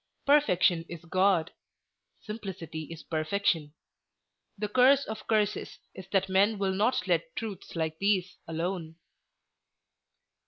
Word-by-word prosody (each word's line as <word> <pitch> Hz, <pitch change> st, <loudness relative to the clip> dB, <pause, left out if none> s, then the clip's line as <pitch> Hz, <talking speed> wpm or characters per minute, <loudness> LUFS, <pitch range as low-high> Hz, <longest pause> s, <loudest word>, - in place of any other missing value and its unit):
Perfection 185 Hz, -, +4 dB
is 170 Hz, 0 st, -8 dB
God; 185 Hz, -1 st, +2 dB, 0.7 s
simplicity 185 Hz, -7 st, -6 dB
is 165 Hz, -1 st, -8 dB
perfection. 160 Hz, -2 st, -1 dB, 0.8 s
The 210 Hz, +1 st, -2 dB
curse 260 Hz, +5 st, +5 dB
of 220 Hz, 0 st, -7 dB
curses 210 Hz, -2 st, 0 dB, 0.2 s
is 190 Hz, -1 st, -10 dB
that 195 Hz, -1 st, +2 dB
men 200 Hz, +3 st, +3 dB
will 195 Hz, -1 st, 0 dB
not 210 Hz, +6 st, +1 dB
let -, -, 0 dB
truths 205 Hz, -6 st, -6 dB
like 160 Hz, -1 st, -2 dB
these 195 Hz, -2 st, +1 dB
alone." 165 Hz, 0 st, -3 dB
190 Hz, 115 wpm, -29 LUFS, 165-210 Hz, 0.8 s, curse